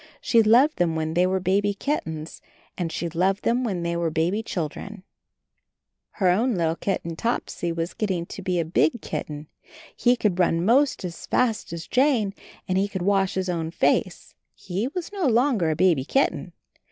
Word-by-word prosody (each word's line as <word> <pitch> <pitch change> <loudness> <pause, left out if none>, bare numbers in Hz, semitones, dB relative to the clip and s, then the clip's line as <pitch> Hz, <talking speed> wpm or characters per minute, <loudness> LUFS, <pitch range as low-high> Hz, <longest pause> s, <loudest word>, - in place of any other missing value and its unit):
She 230 - +3
loved 245 +8 +4
them 170 -2 +1
when 160 0 -2
they 180 +2 +3
were 190 0 0
baby 200 +2 +1
kittens 160 - -4 0.3
and 170 -3 -3
she 170 - -3
loved 185 +4 0
them 245 +2 +1
when 190 -7 -2
they 170 0 -1
were 170 -1 0
baby 165 +7 0
children. 195 +1 -5 1.1
Her 190 - +1
own 220 +4 +2 0.2
kitten 170 -4 -3
Topsy 175 -4 -2
was 165 +1 -3
getting 185 -5 -2 0.2
a 180 -2 +1
big 160 +6 +1
kitten; 150 0 -5 0.5
he 245 0 +3
could 205 -6 0
run 170 -1 +2
most 260 -1 +3
as 170 -2 -7
fast 235 -8 0
as 170 -1 -6
Jane, 250 -7 +2 0.3
and 185 0 +1
he 200 - +1
could 190 -3 -4
wash 195 -1 +1
his 190 0 -1
own 165 -3 -2
face 165 - 0
— - - -51
he 195 +6 -1
was 350 +6 -6
no 380 -7 0
longer 235 - +2
a 155 - 0
baby 165 -6 +3
kitten. 270 - 0
185 Hz, 175 wpm, -24 LUFS, 170-225 Hz, 1.1 s, loved